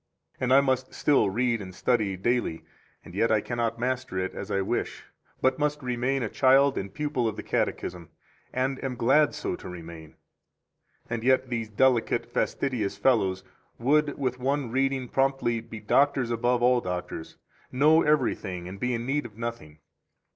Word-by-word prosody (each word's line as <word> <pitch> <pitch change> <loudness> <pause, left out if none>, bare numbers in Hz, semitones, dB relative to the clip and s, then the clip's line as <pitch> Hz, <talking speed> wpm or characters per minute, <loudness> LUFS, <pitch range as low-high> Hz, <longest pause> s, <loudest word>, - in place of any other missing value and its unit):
And 130 -1 0
I 135 +1 +7
must 130 -1 -1
still 145 -8 +3
read 115 +2 0
and 95 -2 -9
study 105 -6 0
daily, 120 -5 -1 0.4
and - - -12
yet 110 +4 +1
I 110 - +4
cannot 115 0 -2
master 125 -4 -2
it 95 0 -2
as 100 - -7
I 100 -1 0
wish, 95 - -3 0.3
8 - - -38
but 130 +2 +2
must 150 -1 -1
remain 125 +2 -1
a - - -1
child 135 +4 +4
and 95 0 -4
pupil 150 -5 -1
of 110 - -2
the - - -6
Catechism, 85 -2 -2 0.4
and 130 +1 -1
am 130 -2 -2
glad 135 +5 +3
so - - -3
to - - -9
remain. 85 -3 -10 0.9
And 115 -1 -3
yet 130 0 +3
these 115 -3 -3
delicate, 120 +1 +2
fastidious 125 -8 -2
fellows 95 -7 +2 0.3
would 145 +4 +2
with 130 -2 -2
one 135 -1 -1
reading 135 0 0
promptly 135 -3 +1
be 115 -1 -9
doctors 130 +2 +2
above 120 +1 +1
all 125 0 +4
doctors, 90 -3 -5 0.3
know 155 +5 +5
everything 110 - 0
and 95 +2 -8
be 125 +2 0
in 115 0 -4
need 140 0 -1
of 110 -2 -20
nothing. 115 -11 -6
120 Hz, 170 wpm, -27 LUFS, 105-135 Hz, 0.9 s, I